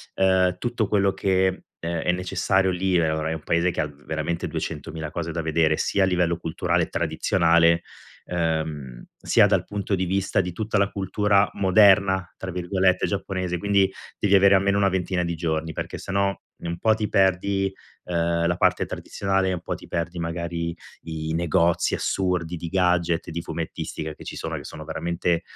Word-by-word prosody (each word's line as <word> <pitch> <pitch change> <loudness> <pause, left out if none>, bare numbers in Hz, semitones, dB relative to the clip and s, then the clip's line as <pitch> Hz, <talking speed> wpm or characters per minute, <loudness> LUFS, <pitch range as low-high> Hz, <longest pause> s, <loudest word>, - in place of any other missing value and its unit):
ehm, 95 -1 +3
tutto 120 -4 -1
quello 100 -2 +2
che, 95 -1 +1 0.2
ehm, 85 0 -3
è 90 - +2
necessario, 95 +1 +1
lì 90 0 +1
ora, 80 -1 0
è - - -1
un 80 -2 -6
Paese 85 +2 +1
che - - -6
ha 75 - +1
veramente 75 +4 -4
ha - - -7
200.000 80 -1 -5
cose 85 -1 -4
da 85 +1 -2
vedere, 80 -1 +2
sia 100 - +1
a - - +5
livello 90 -2 +1
culturale 85 +1 0
e - - -3
tradizionale, 85 0 +2 0.4
ehm, 80 -7 -2 0.2
sia - - +5
dal - - +1
punto 100 0 -3
di 95 0 -1
vista 95 +2 0
di 90 - -4
tutta 110 +4 -2
la 100 0 +2
cultura 100 +1 +2
"moderna", 95 -2 +4
tra 95 - -6
virgolette, 90 +1 +1
giapponese; 95 -3 -2
quindi 100 +1 +2 0.3
devi 100 -1 +3
avere 100 0 +6
almeno 100 +1 +2
una 100 -1 +3
ventina 90 -1 -1
di 85 0 -2
giorni 80 -1 -2
perché - - -5
se - - -7
no 100 0 0 0.2
un 85 0 -5
po' 110 +4 +3
ti 110 -1 -2
perdi, 95 +1 +2 0.3
ehm, 85 -1 0
la 85 - +1
parte - - +2
tradizionale, 95 -1 -1
un 90 -2 -3
po' - - -4
ti - - -12
perdi 85 +1 -3
magari 85 0 -3 0.3
i 80 -1 -4
negozi 85 0 +2
assurdi 90 -3 -1
di 85 0 -6
gadget, 90 -3 +1
di 85 +1 -3
fumettistica 80 -1 -5
che - - -13
ci - - -7
sono, - - -4
che - - -6
sono - - -9
veramente 85 0 -1
90 Hz, 180 wpm, -24 LUFS, 85-95 Hz, 0.4 s, avere